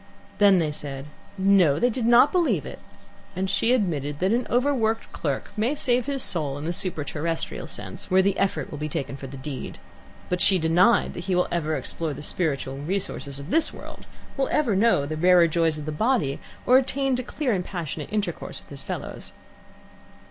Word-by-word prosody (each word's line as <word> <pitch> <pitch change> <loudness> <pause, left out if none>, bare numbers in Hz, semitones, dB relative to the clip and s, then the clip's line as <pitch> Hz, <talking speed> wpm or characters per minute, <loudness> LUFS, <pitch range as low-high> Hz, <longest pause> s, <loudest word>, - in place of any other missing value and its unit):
Then 200 -2 +6
they 160 -3 +1
said, 140 -2 -7 0.3
"No 190 -7 +4
they 245 +8 +2
did 230 0 -1
not 240 +4 +6
believe 355 -2 +1
it," - - -8 0.6
and 190 +1 -1
she 200 +5 +2
admitted 155 - 0
that 185 +6 +1
an 245 +1 0
overworked 240 -3 +1
clerk 140 -4 -3
may 230 +7 0
save 250 -3 +1
his 275 -2 0
soul 150 -8 0
in 145 - -7
the 170 +2 -2
superterrestrial 165 -2 -3
sense, - - -7
where 190 0 +4
the 195 0 +2
effort 195 0 -1
will 150 - -6
be 150 0 -3
taken 140 -1 -4
for 135 0 -8
the 135 +1 -9
deed, 135 0 -6 0.5
but 180 0 -1
she 195 - +4
denied 175 +7 +3
that 175 - -7
he 190 -2 0
will 180 - +2
ever 160 -2 0
explore 160 -2 -2
the 145 - -8
spiritual 140 -6 -2
resources 150 -4 -3
of 140 +4 -8
this 325 - +4
world, - - -11 0.3
will 270 - 0
ever 260 -9 +2
know 200 -8 +3
the 155 +2 -4
rarer 175 +1 +5
joys 165 -1 +1
of 150 - -6
the 155 - -3
body, 215 - 0 0.3
or 255 +1 +7
attain 270 0 0
to 250 - -1
clear 255 0 -2
and 185 -2 -1
passionate 165 -5 -5
intercourse 210 -1 -3
with - - -20
his - - -4
fellows. - - -6
180 Hz, 195 wpm, -25 LUFS, 150-230 Hz, 0.6 s, or